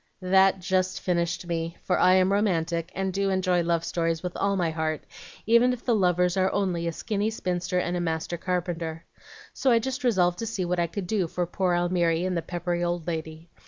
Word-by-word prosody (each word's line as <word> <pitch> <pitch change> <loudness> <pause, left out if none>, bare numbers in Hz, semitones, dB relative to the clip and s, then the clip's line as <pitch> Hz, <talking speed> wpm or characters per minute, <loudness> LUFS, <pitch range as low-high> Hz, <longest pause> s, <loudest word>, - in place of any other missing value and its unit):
"That 190 +1 +4
just 185 +1 0
finished 170 -1 -1
me, 165 0 -3
for - - +1
I 185 - +5
am 190 +1 +3
romantic, 170 -4 0
and 190 0 -2
do 195 +1 0
enjoy 185 -2 +2
love 170 -1 0
stories 165 -1 -1
with 180 -1 -4
all 200 0 +1
my 175 -4 0
heart, 160 -1 -2 0.4
even 235 +3 +4
if 245 - -8
the 245 - +2
lovers 180 -3 +2
are 190 0 +2
only 180 -4 -1
a - - 0
skinny 210 +4 -2
spinster 180 -4 -2
and 180 0 0
a - - -1
master 165 0 -2
carpenter. 170 -2 -3 0.5
So 270 - +1
I 235 - +5
just 265 +4 -3
resolved 180 -7 +2
to 230 - -3
see 200 -5 -2
what 175 0 -1
I 170 - +2
could 190 +3 -5
do 190 -2 0
for 175 +2 -2
poor 180 +1 0
Almiry 175 -1 +1
and 185 -1 -1
the 170 - 0
peppery 175 +1 -3
old 175 -1 -2
lady. 160 0 -5
180 Hz, 210 wpm, -26 LUFS, 170-190 Hz, 0.5 s, I